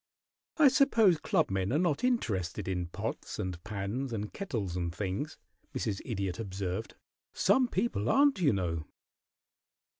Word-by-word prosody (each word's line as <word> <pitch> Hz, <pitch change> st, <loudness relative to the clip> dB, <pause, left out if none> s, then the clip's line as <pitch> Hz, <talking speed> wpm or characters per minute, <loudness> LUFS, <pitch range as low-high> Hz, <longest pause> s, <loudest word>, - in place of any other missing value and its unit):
"I 310 Hz, -3 st, +7 dB
suppose 230 Hz, -, +4 dB
clubmen 95 Hz, -8 st, +1 dB
are 145 Hz, -, +3 dB
not 165 Hz, -, +1 dB
interested 105 Hz, -, 0 dB
in 90 Hz, -2 st, -1 dB
pots -, -, -5 dB
and 90 Hz, -2 st, -4 dB
pans 105 Hz, +6 st, -3 dB
and 105 Hz, -2 st, -4 dB
kettles 110 Hz, -, -3 dB
and 85 Hz, -2 st, -1 dB
things," 100 Hz, -, -3 dB, 0.4 s
Mrs. 100 Hz, -3 st, -2 dB
Idiot 100 Hz, -5 st, -3 dB
observed. 95 Hz, 0 st, -4 dB, 0.4 s
"Some 245 Hz, +7 st, +3 dB
people 190 Hz, -, 0 dB
aren't, 280 Hz, -7 st, +4 dB
you 150 Hz, -, +5 dB
know." 85 Hz, -6 st, -1 dB
105 Hz, 130 wpm, -31 LUFS, -, 0.4 s, I